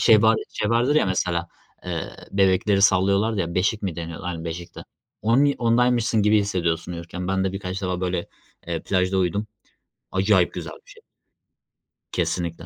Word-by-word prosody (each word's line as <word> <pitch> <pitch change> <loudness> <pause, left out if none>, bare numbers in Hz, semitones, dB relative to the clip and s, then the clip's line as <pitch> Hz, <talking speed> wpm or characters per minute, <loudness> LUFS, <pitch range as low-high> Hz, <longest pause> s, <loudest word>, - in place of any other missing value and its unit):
şey 110 -2 +6
var 110 0 +5
şey 105 - -2
vardır 120 +5 +2
ya, 155 - +3
mesela, 85 -2 -1 0.4
ııı, 85 -2 -3 0.2
bebekleri 95 +1 +3
sallıyorlardı 100 +2 +3
ya 85 0 -3
beşik 100 +4 +1
mi 90 -5 -3
deniyordu. 85 +2 -6
Aynen 85 -2 -4
beşikti. 85 +1 -7 0.4
Onun 115 +6 +4
y 140 -1 +3
ondaymışsın 120 -2 +2
gibi 105 +1 +4
hissediyorsun 90 -4 -1
uyurken. 85 +2 -6
Ben 95 0 +1
de 95 - -1
birkaç 95 0 -5
defa 90 -1 -2
böyle, 90 -1 -2 0.4
eee, 85 -2 -2
plajda 95 0 +1
uyudum. 95 +4 0 0.7
Acayip 95 -1 +3
güzel - - -6
bir - - -20
şey. - - -17 1.1
Kesinlikle. 85 -1 -2
95 Hz, 160 wpm, -23 LUFS, 90-105 Hz, 1.1 s, şey